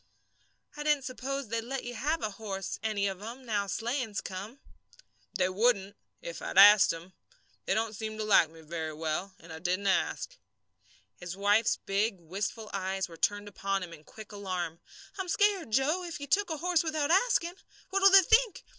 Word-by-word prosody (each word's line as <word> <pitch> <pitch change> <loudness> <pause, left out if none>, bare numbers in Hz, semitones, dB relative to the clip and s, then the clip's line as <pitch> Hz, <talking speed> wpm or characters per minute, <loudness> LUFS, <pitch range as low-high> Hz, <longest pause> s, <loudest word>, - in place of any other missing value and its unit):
"I 295 - -6
didn't 295 -2 +2
suppose 260 0 -4
they'd 230 +1 -1
let 265 +3 -4
you 245 - -6
have 300 +7 -1
a 215 - -1
horse, 195 -2 -5
any 210 -2 -1
of 195 -1 -5
'em, 240 +5 -8
now 205 -3 -1
sleighing's 230 -1 -2
come." 200 +8 -7 0.8
"They 185 -1 +2
wouldn't 200 0 +1 0.3
if - - -7
I'd - - -5
asked 205 +1 +9
'em. 170 +3 -9 0.5
They - - +1
don't 220 0 -1
seem 215 +1 -5
to 215 - -2
like 200 -6 +5
me 160 0 -15
very 160 0 -5
well, 160 +5 -3
and 165 0 -12
I 160 - -8
didn't 185 +4 -1
ask." 190 -2 0 0.8
His 180 +1 -7
wife's 205 +3 +3
big, 200 0 -1
wistful 200 +6 -5
eyes 190 -1 -2
were 170 - -12
turned 205 +4 0
upon 195 -1 -2
him 170 -2 -8
in 155 -2 -13
quick 215 +6 -12
alarm. 180 -5 -4 0.4
"I'm 375 -2 -3
scared, 405 - +2
Joe, 270 +10 +2
if 340 -4 -6
you 285 - -5
took 395 +8 +1
a 320 - -2
horse 345 +1 +1
without 310 -2 -1
asking. 375 -3 +3 0.4
What'll 390 0 +6
they 390 0 +8
think? 450 +4 +3
215 Hz, 185 wpm, -30 LUFS, 190-280 Hz, 0.8 s, asked